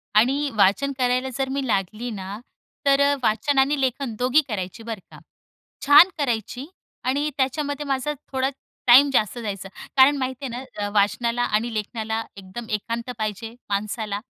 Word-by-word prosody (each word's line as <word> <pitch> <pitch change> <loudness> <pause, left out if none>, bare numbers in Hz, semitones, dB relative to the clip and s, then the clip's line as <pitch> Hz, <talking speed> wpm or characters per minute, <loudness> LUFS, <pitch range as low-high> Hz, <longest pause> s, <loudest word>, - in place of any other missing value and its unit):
आणि 275 +6 +3
वाचन 210 +8 +3
करायला 255 0 +1
जर 270 -1 -1
मी 275 0 -2
लागली 215 +3 -1
ना 195 0 -6 0.5
तर 275 0 +4
अ, 285 0 +4
वाचन 270 +6 +2
आणि 280 +2 +2
लेखन 260 -2 -1
दोघी 255 +5 +4
करायची 205 -1 -5
बरं 225 -2 -5
का. - - -13 0.7
छान 290 +6 +8
करायची 250 -1 -2 0.4
आणि 285 +4 0
त्याच्यामध्ये 285 +2 -1
माझा 275 +1 -1 0.2
थोडा 265 0 +1 0.4
टाईम 265 +4 +8
जास्त 215 -2 +1
जायचं 200 -4 -5 0.3
कारण 275 +2 +6
माहितीये 260 0 -3
ना 245 +2 -6 0.2
अ, - - -3
वाचनाला 235 +4 +1
आणि 230 +1 0
लेखनाला 220 +1 -3
एकदम 195 +4 -8
एकांत 230 +3 -3
पाहिजे 215 +1 -4 0.2
माणसाला. 205 0 -2
245 Hz, 150 wpm, -23 LUFS, 215-275 Hz, 0.7 s, छान